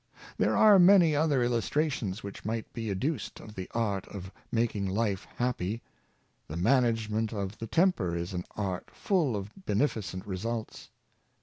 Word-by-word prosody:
There - - +2
are 210 -3 +8
many 175 -4 +7
other 145 -4 +2
illustrations 120 -3 0
which 100 0 -8
might 110 +1 -3
be 115 -2 -4
adduced 115 - -2
of 105 - -11
the 95 -3 -6
art 105 -5 -1
of 95 -2 -8 0.2
making 115 -4 0
life 100 0 -1
happy. 115 -3 -1 0.6
The 75 - -5
man 130 +10 +4
agement 110 -1 -1
of 100 -1 -4
the 115 - -5
temper 115 - +2
is 85 +2 -3
an 90 -1 -3
art 95 -4 -3
full 165 - 0
of 100 0 -5 0.2
beneficent 100 -4 -1
results. 110 +4 -4
110 Hz, 150 wpm, -29 LUFS, 95-125 Hz, 0.6 s, are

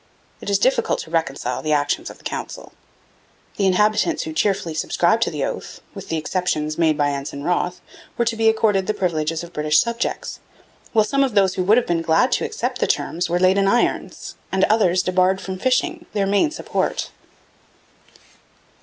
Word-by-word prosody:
It - - -5
is 200 - +3
difficult 260 +7 +1
to 160 - -11
reconcile 135 -6 -2
the 155 -1 0
actions 145 -1 0
of - - -12
the - - -22
Council. - - -6 0.9
The 195 - +2
inhabitants 210 - +2
who 320 - -6
cheerfully 195 - 0
subscribed 155 - +1
to - - +2
the - - -2
oath, - - -6
with - - -9
the 165 - -1
exceptions 155 -2 -1
made 160 -3 +3
by 145 -1 +2
Ensign 140 0 -5
Wroth, 180 +1 -1 0.4
were 235 - +1
to 230 0 0
be 225 0 +3
accorded 210 -4 +1
the 215 - 0
privileges 165 -4 -1
of 170 - -11
British 150 0 +2
subjects, 235 +4 -2 0.5
while 215 -2 +3
some 275 +5 +1
of 260 -5 -2
those 195 -2 +4
who 185 - -1
would 215 +4 +5
have 245 - +2
been 170 -1 0
glad 165 +10 +2
to - - +1
accept 450 +1 -3
the - - 0
same - - +4
terms 175 +1 -3
were 175 - +1
laid 185 +2 +3
in 195 - +2
irons, 240 +4 0 0.2
and 190 0 +1
the - - +4
others 185 -4 +2
debarred 185 +1 +2
from 190 -1 -6
fishing, 330 - 0
their 200 -2 +1
main 200 +9 +2
support. 315 - -2
190 Hz, 195 wpm, -21 LUFS, 165-215 Hz, 0.9 s, would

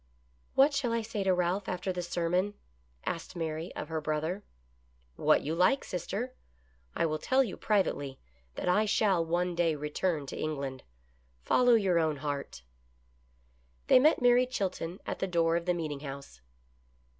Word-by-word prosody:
"What 280 +2 +5
shall 275 -4 0
I 230 -1 0
say 215 -2 -3
to 190 - +4
Ralph 180 +2 0
after 185 +1 -2
the 180 - -3
sermon 175 +3 0 0.5
asked 170 +2 -4
Mary 160 0 -3
of - - -5
her 160 -1 -2
brother. 155 +6 -2 0.4
" 60 - -37 0.3
What - - +3
you 150 - -2
like, 185 +11 +3
sister. 205 +8 -4 0.6
I - - +1
will 155 -1 -1
tell 265 +8 +3
you 210 -8 -5
privately 145 -10 0 0.4
that - - -4
I 210 +4 +4
shall 200 -4 +2
one 175 +2 0
day 170 -2 +1
return 150 +1 -1
to - - -7
England. 140 -4 -3 0.6
Follow 245 - +5
your 190 -6 +3
own 155 -2 +1
heart" 140 - -5 1.2
They - - +7
met 295 -1 +4
Mary 245 +1 +5
Chilton 185 -6 -3
at - - -4
the 190 - -1
door 165 -2 +2
of 170 0 -1
the 180 - +3
meeting 155 -4 -3
house. 140 - -9
175 Hz, 165 wpm, -30 LUFS, 155-205 Hz, 1.2 s, They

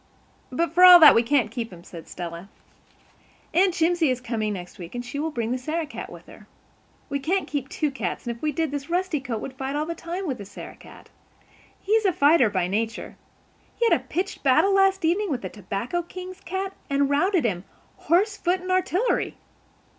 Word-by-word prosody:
"But 330 +4 -1
for 360 +2 +5
all 360 -1 +11
that 315 - +10
we 230 - +4
can't 240 -3 +1
keep 230 -2 -5
him," 170 -1 -12
said 170 -2 -11
Stella. 175 +2 -7 1.0
"Aunt 365 +1 +3
Jimsie 335 -3 +2
is 255 -1 0
coming 225 -3 -2
next 180 -2 -8
week 175 +5 -9
and 245 0 -4
she 265 +4 -5
will 315 +2 -1
bring 235 -6 -3
the 255 - -1
Sarah 315 +5 -2
cat 300 - -8
with - - -12
her. - - -15 0.6
We 280 - -2
can't 365 +7 -1
keep 280 -2 -4
two 300 -2 -1
cats; 225 -10 -4
and 235 -1 -3
if 235 - -18
we 305 - 0
did 320 0 -1
this 285 +1 -5
Rusty 355 -2 0
Coat 245 -5 -4
would 265 - -6
fight 265 +1 -4
all 300 +1 -1
the 335 - -3
time 345 +3 -5
with 265 -7 -3
the 200 - -7
Sarah 195 - -10
cat. - - -15 0.7
He's 435 +2 +1
a 380 - +4
fighter 285 -6 +4
by 185 -3 0
nature. 225 +4 -3 0.6
He 470 - 0
had - - +4
a - - +1
pitched 375 +3 -3
battle 285 +9 +4
last 390 -2 +3
evening 380 +5 +1
with 255 -7 -3
the 185 - -4
tobacco 205 - -4
king's 365 +2 -9
cat 380 +1 -4 0.2
and 280 0 +2
routed 320 +3 +2
him, 185 -5 -1 0.3
horse, 390 +6 +2
foot 360 +2 0
and 370 0 -4
artillery." 370 +5 0
290 Hz, 210 wpm, -24 LUFS, 235-360 Hz, 1.0 s, all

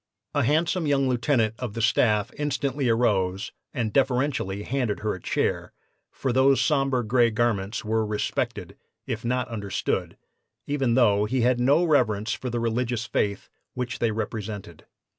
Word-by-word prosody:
A - - +2
handsome 160 +5 +1
young 140 -2 +2
lieutenant 120 -3 +1
of 125 -5 -5
the - - -3
staff 110 -2 +2
instantly 140 -2 -1
arose 100 -3 +1 0.2
and 115 -6 -2
deferentially 125 -7 0
handed 125 -4 -2
her 110 0 -1
a 95 - -8
chair, - - -1 0.4
for 130 -3 -2
those 135 +1 +4
sombre 135 -5 +1
gray 120 +1 +3
garments 110 -2 -1
were 110 +1 +1
respected, 105 -1 -3 0.3
if 110 -1 -4
not 125 +1 0
understood, 105 -5 -3 0.5
even 135 -5 0
though 105 -5 +4
he 125 +4 0
had 125 +1 +2
no 140 +7 +4
reverence 110 -10 +2
for 130 - -4
the 120 0 -2
religious 120 0 -1
faith 100 -3 -1 0.3
which 125 -1 -3
they 115 - +2
represented. 105 -5 -5
120 Hz, 150 wpm, -25 LUFS, 110-130 Hz, 0.5 s, those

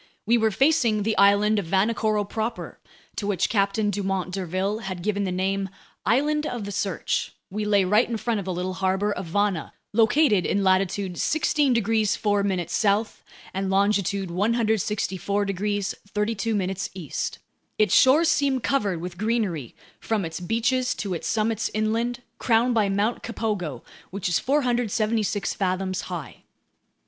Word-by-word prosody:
We 230 +3 +4
were 220 -2 +3
facing 235 -3 +2
the 220 +1 0
island 205 +2 +5
of 185 - -5
Vanikoro 210 +3 +1
proper, 220 +2 -4 0.4
to 205 - -2
which 195 -4 +1
Captain 205 0 +1
Dumont 190 -2 -2
d'Urville 190 +3 -2
had 190 -5 -6
given 205 0 0
the 185 - -2
name 195 +1 -1 0.4
"Island 300 +7 +2
of 240 -3 -4
the 205 - -5
Search"; 195 -3 -2 0.2
we 210 +2 -2
lay 205 -2 +3
right 210 +6 +3
in 230 - -1
front 225 -1 -1
of 195 - -6
the 190 - -2
little 180 +1 -3
harbor 190 +2 0
of 190 -3 -4
Vana, 200 -1 0 0.2
located 225 - +4
in 200 +3 0
latitude 190 -1 +1
16 295 -3 +2
degrees 220 -2 +2
4' 200 -4 0
south 205 +4 0 0.3
and 190 0 -2
longitude 200 -1 +1
164 205 -1 0
degrees 200 0 -1 0.2
32' 210 -2 -1 0.2
east. 170 -7 -4 0.4
Its 215 - +3
shores 295 +6 +6
seemed 275 -6 +1
covered 205 -8 0
with 175 0 -7
greenery 210 - -1 0.2
from 215 -5 -1
its 165 +1 -5
beaches 235 +6 0
to 200 -3 -3
its 170 - -4
summits 220 0 0
inland, 230 +3 -1 0.2
crowned 240 +1 +3
by 215 -3 +2
Mt. 205 +4 0
Kapogo, 205 - -3 0.3
which 195 0 -3
is 175 - +2
476 230 -7 0
fathoms 185 -1 -1
high. 170 -5 -6
205 Hz, 150 wpm, -25 LUFS, 190-225 Hz, 0.4 s, shores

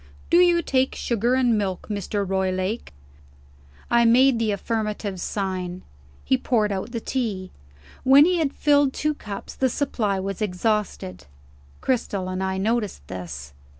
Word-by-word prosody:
Do 340 - +6
you 350 -1 +5
take 260 -1 +1
sugar 235 +2 0
and 245 -3 +3
milk, 190 -3 -3
Mr. 205 -1 -2
Roylake?" 190 +3 -1 1.0
I 235 0 +5
made 245 +2 +5
the 225 -1 +1
affirmative 210 -2 -3
sign. 185 -2 -3 0.4
He 260 - +2
poured 220 -5 +1
out 195 +4 -3
the 235 - -3
tea. 215 -7 -3 0.5
When 275 +3 +7
he 360 0 +2
had 300 -4 +1
filled 285 -2 +3
two 305 0 0
cups, 205 -8 -8
the 260 - +1
supply 225 -8 -1
was 195 +1 -4
exhausted. 195 - -2 0.5
Cristel 205 -7 -1
and 185 0 -3
I 190 0 -1
noticed 210 - -1
this. 75 -7 -7
215 Hz, 145 wpm, -24 LUFS, 190-255 Hz, 1.0 s, When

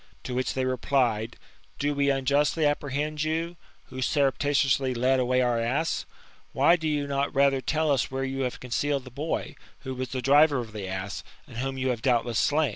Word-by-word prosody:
To 125 - -5
which 130 +1 -1
they 130 -1 0
replied: 125 -3 0 0.4
"Do 145 +1 0
we 140 0 +1
unjustly 140 +3 +2
apprehend 145 +1 -1
you, 165 +2 -2 0.3
who 130 0 -6
surreptitiously 135 -1 +1
lead 130 +2 +2
away 125 0 +2
our 120 -2 +1
ass? 135 +8 -1 0.5
Why 170 - +5
do 160 -2 -3
you 145 -2 0
not 140 -1 -2
lather 135 -1 +3
tell 155 +4 0
us 135 -3 +1
where 135 0 -3
you 135 0 -4
have 125 -2 -2
concealed 140 +2 -1
the 130 - -11
boy, 150 +6 -3 0.3
who 130 -2 -5
was 130 -1 -4
the 130 - -3
driver 145 +2 +5
of 115 -3 -5
the 100 -3 -5
ass, 95 +2 -5 0.2
and 125 -6 -11
whom 135 +2 -3
you 130 0 0
have 120 -3 -2
doubtless 120 -3 +1
slam?" 150 -1 +2
135 Hz, 195 wpm, -27 LUFS, 125-145 Hz, 0.5 s, Why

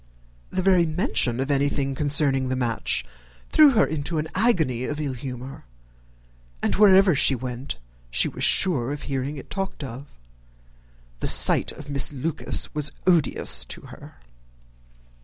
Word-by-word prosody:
The 185 - -3
very 180 -3 +3
mention 155 - 0
of 135 +2 -2
anything 140 0 -1
concerning 140 -2 +3
the 130 - -1
match 115 - -1 0.4
threw 305 -2 +6
her 220 - +4
into 155 +1 -4
an 155 +1 -3
agony 165 - 0
of 150 +2 -5
ill 145 -3 -3
humour, 130 - -8 1.0
and - - 0
wherever 195 -2 +5
she 135 -1 +2
went 125 - -6 0.3
she - - +1
was - - -6
sure 140 -9 +2
of 145 - -6
hearing 135 +1 -4
it 135 - -11
talked 195 -6 -4
of. 135 +2 -8 1.1
The - - -2
sight - - +4
of 145 - -12
Miss 140 0 0
Lucas 150 +3 -1
was 150 -2 +1
odious 155 - +2
to - - -9
her. - - -14
145 Hz, 145 wpm, -23 LUFS, 130-165 Hz, 1.1 s, threw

